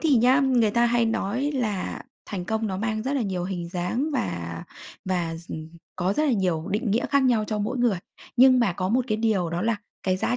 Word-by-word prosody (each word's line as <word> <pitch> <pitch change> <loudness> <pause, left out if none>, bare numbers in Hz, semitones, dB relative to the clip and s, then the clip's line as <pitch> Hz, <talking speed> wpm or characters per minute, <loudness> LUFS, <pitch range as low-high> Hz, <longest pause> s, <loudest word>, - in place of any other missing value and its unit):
thì 305 -5 +4
nhá, 255 +4 +5
người 245 -5 +3
ta 235 +2 +3
hay 235 0 +2
nói 230 +5 -1
là 215 -8 -2 0.2
thành 185 -4 -4
công 220 +3 -1
nó 190 -3 -2
mang 215 +1 -1
rất 265 +4 -2
là 275 - +1
nhiều 185 -4 -2
hình 180 -2 -4
dáng 190 - -1
và 85 - -3 0.4
và 175 -3 -1
s 170 +1 -11
ừm, 155 0 -6 0.3
có 185 +2 +1
rất 305 - +1
là 285 - +2
nhiều 180 -6 0
định 215 +1 0
nghĩa 230 +4 +1
khác 280 -1 +4
nhau 240 -4 +3
cho 215 - -2
mỗi 235 +5 -2
người. 230 -7 +2 0.4
Nhưng 255 +1 +7
mà 210 -6 +2
có 185 +1 -2
một 245 +4 +2
cái 215 - +1
điều 215 -6 +1
đó 170 +2 -2
là 225 -1 +1 0.3
cái 185 -1 +1
giá 240 +6 0
215 Hz, 235 wpm, -25 LUFS, 185-245 Hz, 0.4 s, Nhưng